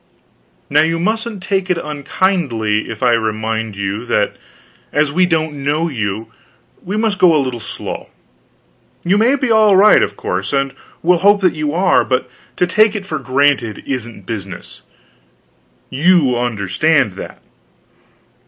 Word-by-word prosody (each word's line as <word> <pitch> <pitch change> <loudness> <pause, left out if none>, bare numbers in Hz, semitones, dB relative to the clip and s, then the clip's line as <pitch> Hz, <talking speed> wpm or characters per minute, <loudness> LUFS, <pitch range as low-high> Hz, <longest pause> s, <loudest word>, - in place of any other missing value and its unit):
Now 150 +1 +3
you 165 +1 +1
mustn't 215 +2 -2
take 190 -1 -1
it 180 - +1
unkindly 145 - -1
if - - -6
I 125 - +4
remind 110 -1 -1
you 100 +3 -3
that - - 0 0.6
as 150 -1 +1
we 180 +4 +2
don't 155 -4 -1
know 155 +4 0
you, 110 -4 -4 0.5
we 200 +4 -3
must 215 -2 0
go 175 -4 +5
a - - +4
little 130 -4 -2
slow. 110 - -7 0.9
You 190 +4 +2
may 245 +5 +4
be 260 -4 -1
all 215 -2 +5
right, 205 +3 +6
of 100 0 -2
course, 95 +2 -3
and 135 -1 0 0.3
we'll 175 +1 +3
hope 205 +2 +4
that 185 -3 +3
you 150 -2 -2
are; 190 +2 +3
but 130 -1 -1 0.3
to 180 - +2
take 215 +4 +3
it 200 -2 -4
for 155 -4 -4
granted 130 -5 0
isn't 120 -6 -5
business. 100 -3 -7 1.1
You 155 -4 +3
understand 120 - +1
that. - - -9
150 Hz, 150 wpm, -17 LUFS, 115-185 Hz, 1.1 s, right